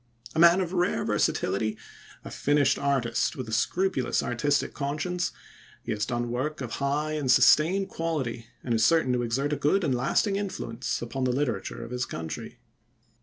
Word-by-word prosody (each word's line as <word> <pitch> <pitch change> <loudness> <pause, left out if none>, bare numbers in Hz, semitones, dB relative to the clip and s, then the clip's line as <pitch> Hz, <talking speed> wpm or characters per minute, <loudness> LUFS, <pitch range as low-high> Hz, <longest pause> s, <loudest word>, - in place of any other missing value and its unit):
A 160 - -1
man 170 +3 +7
of 180 -1 -3
rare 180 -1 +1
versatility, 110 +2 0 0.5
a - - -7
finished 145 -1 +2
artist 130 -5 0
with 130 -3 -6
a - - -7
scrupulous 175 +4 0
artistic 145 +4 0
conscience, 155 +5 -2 0.5
he - - -4
has 105 -1 -1
done 120 -1 -2
work 140 +5 -2
of 125 -4 -5
high 145 +2 0
and 150 -4 -2
sustained 170 +9 +5
quality, 135 -9 -3 0.2
and 120 - -1
is 110 -1 +2
certain 130 -1 +3
to 125 - +1
exert 135 +5 -1
a - - -1
good 150 +8 +2
and 145 -5 +1
lasting 135 - +1
influence 130 - -3
upon 130 +3 -3
the 125 - +2
literature 120 -4 -2
of 115 - -11
his 125 +1 -2
country. 80 -1 -6
140 Hz, 170 wpm, -27 LUFS, 120-160 Hz, 0.5 s, man